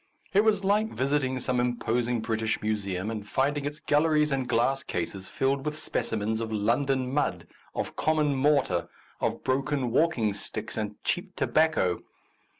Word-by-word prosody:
It 200 +2 +5
was 210 -3 +3
like 210 +3 +2
visiting 135 -1 0
some 125 0 0
imposing 120 -1 0
British 110 0 -1
Museum 100 -2 -1
and 105 -2 -5
finding 140 +5 0
its 145 +1 -4
galleries 150 0 +3
and 130 -2 -1
glass 130 +3 +2
cases 95 -1 -3
filled 135 +1 0
with 150 +1 -2
speci 155 -6 -1
mens 110 +2 -1
of 110 -1 -3
London 125 +5 +1
mud, 115 -12 0 0.3
of - - -3
common 155 -2 +2
mortar, 135 - +2 0.3
of - - -1
broken 135 -1 0
walking 125 -7 +2
sticks 100 - -4
and 105 -1 -3
cheap 180 +1 -1
tobacco. 155 - +2
130 Hz, 150 wpm, -28 LUFS, 110-150 Hz, 0.3 s, It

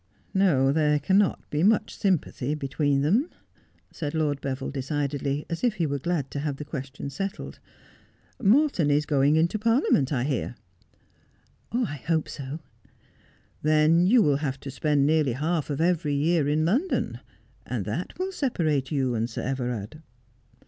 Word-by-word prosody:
No; 150 -9 +3
there 150 0 +2
cannot 190 +7 +1
be 150 - 0
much 215 +3 +2
sympathy 155 -7 0
between 140 0 0
them,' 220 - +2 0.6
said 150 -1 -4
Lord 150 -3 0
Beville 135 0 -3
decidedly, 140 +1 -2
as 165 - -5
if 240 -4 +2
he 170 -4 0
were 140 -1 -2
glad 150 -2 -2
to 145 - -3
have 145 -1 -2
the 150 - -6
question 140 -1 -6
settled. 195 +5 -5 0.5
' - - -27
Morton 270 - +3
is 145 +1 +2
going 145 0 +3
into 170 +6 +2
Parliament, 225 - +2
I 125 -4 0
hear.' 130 -3 -2 0.7
' - - -38 0.2
I 145 - -5
hope 160 -2 +1
so.' 140 +2 -6 0.5
' - - -34
Then 155 +3 +4
you 235 +2 +5
will 145 -3 +3
have 135 -3 -3
to 135 - -6
spend 145 0 +1
nearly 150 -4 +2
half 155 +4 -1
of 145 - -2
every 160 -4 +1
year 155 +1 +2
in 155 +2 +1
London, 260 - 0 0.4
and - - -4
that - - -4
will 375 +1 -2
separate 160 - -1
you 135 -4 0
and 115 0 -1
Sir 115 - -5
Everard.' 125 0 -3
150 Hz, 165 wpm, -26 LUFS, 140-170 Hz, 0.7 s, you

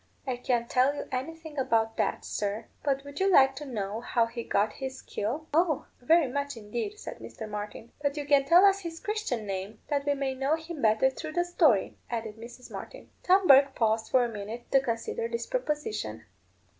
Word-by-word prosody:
I 260 -2 -1
can't 245 -1 0
tell 260 +4 +3
you - - -5
anything 305 +3 -5
about 225 -4 +1
that, - - -1
sir. 210 +2 -2 0.2
But 275 -1 0
would 285 0 -8
you 385 0 +3
like 270 -5 +6
to 295 - -6
know 215 -3 -3
how 240 -1 +2
he 235 +1 -6
got 210 0 +1
his 265 -1 -5
skill?" 255 +10 -4
"Oh! 325 -2 +2 0.2
very 320 +4 +4
much, 280 0 -3
indeed," 235 - -4
said - - -8
Mr. 220 - -8
Martin. 210 +2 -6
"But 285 0 -1
you 290 - -3
can 285 -1 +4
tell 345 +7 +7
us 395 0 +5
his 335 -3 -6
Christian 420 - -2
name, 195 +2 -5
that 285 -1 -1
we 285 - +3
may 270 -1 -1
know 270 +4 +1
him 320 -1 -7
better 220 +4 +4
through 310 +3 -7
the 350 +1 +1
story," 310 - +2
added 225 -2 -4
Mrs. 240 +2 -11
Martin. - - -9
Tom 375 +1 +4
Bourke 275 -2 +7
paused 220 -1 +1
for 255 -2 +4
a - - -1
minute 225 +2 -7
to 270 - +6
consider 230 -2 -2
this 235 0 -3
proposition. 295 - -3
265 Hz, 200 wpm, -28 LUFS, 225-300 Hz, 0.2 s, tell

